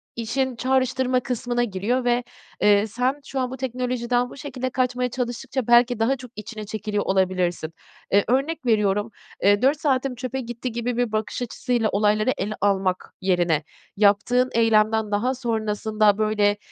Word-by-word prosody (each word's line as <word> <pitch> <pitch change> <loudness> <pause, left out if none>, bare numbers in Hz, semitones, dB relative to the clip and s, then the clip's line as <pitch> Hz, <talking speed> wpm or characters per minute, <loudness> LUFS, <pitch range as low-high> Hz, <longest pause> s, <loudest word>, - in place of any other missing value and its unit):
işin 250 +3 -1
çağrıştırma 255 +1 +1
kısmına 245 -1 -2
giriyor 235 +4 -1
ve, 245 0 +2 0.4
eee, 205 0 +4
sen 250 +6 -1
şu 270 - -4
an 255 -1 -1
bu 260 - -6
teknolojiden 245 -1 -1
bu - - -12
şekilde 260 -2 -4
kaçmaya 250 -1 0
çalıştıkça, 250 +1 -3
belki, 240 0 +5
daha 235 +5 +2
çok 250 -2 -11
içine 215 0 -7
çekiliyor 210 0 -3
olabilirsin. 185 -4 0 0.4
Eee, 200 +1 +5
örnek 270 +4 0
veriyorum, 210 -2 +2 0.3
eee, 205 +1 +4
4 280 +4 +3
saatim 270 -3 0
çöpe 255 +2 -4
gitti 240 +1 -5
gibi 235 +1 -3
bir 245 -2 0
bakış 215 +3 -2
açısıyla 240 -1 -1
olayları 210 +4 +2
ele 205 +2 -2
almak 190 -2 0
yerine, 175 -4 +1 0.3
yaptığın 215 +5 +3
eylemden 220 -1 +3
daha 225 +6 +1
sonrasında, 215 -3 +1
böyle, 210 -1 +2
235 Hz, 150 wpm, -23 LUFS, 210-250 Hz, 0.4 s, belki